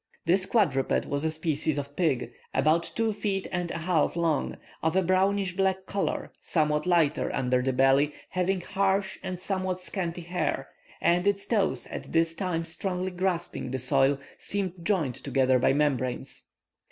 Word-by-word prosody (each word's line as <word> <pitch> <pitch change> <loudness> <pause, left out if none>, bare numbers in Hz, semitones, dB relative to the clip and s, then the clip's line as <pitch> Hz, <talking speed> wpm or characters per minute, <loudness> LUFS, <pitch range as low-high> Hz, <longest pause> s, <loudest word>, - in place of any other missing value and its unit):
This 185 +3 +3
quadruped 155 - +2
was 140 +1 -1
a 160 - +2
species 155 -1 0
of 140 0 -5
pig, 150 -8 0 0.2
about 155 +5 +3
two 225 -1 +1
feet 200 -2 -2
and 180 -1 -2
a - - -3
half 165 -2 +1
long, 165 -4 0 0.2
of 160 +2 +1
a 190 - +4
brownish 190 +1 +2
black 190 -1 +1
color, 200 -1 -2
somewhat 150 0 +1
lighter 165 -4 +2
under 125 -1 +1
the 130 +1 +1
belly, 135 +3 +4 0.2
having 185 0 0
harsh 195 +1 0
and 180 -1 -4
somewhat 185 -1 -2
scanty 180 -2 -3
hair, 170 -5 -2 0.3
and 175 +3 +3
its 200 0 +1
toes 190 - +1
at - - -7
this 165 0 +3
time 165 -2 -2
strongly 180 +3 -2
grasping 180 -6 -2
the 130 - -2
soil 135 +2 +3 0.2
seemed 195 -3 -2
joined 170 -9 +1
together 130 +1 +2
by - - +4
membranes. 135 -3 -1
170 Hz, 160 wpm, -28 LUFS, 145-190 Hz, 0.3 s, a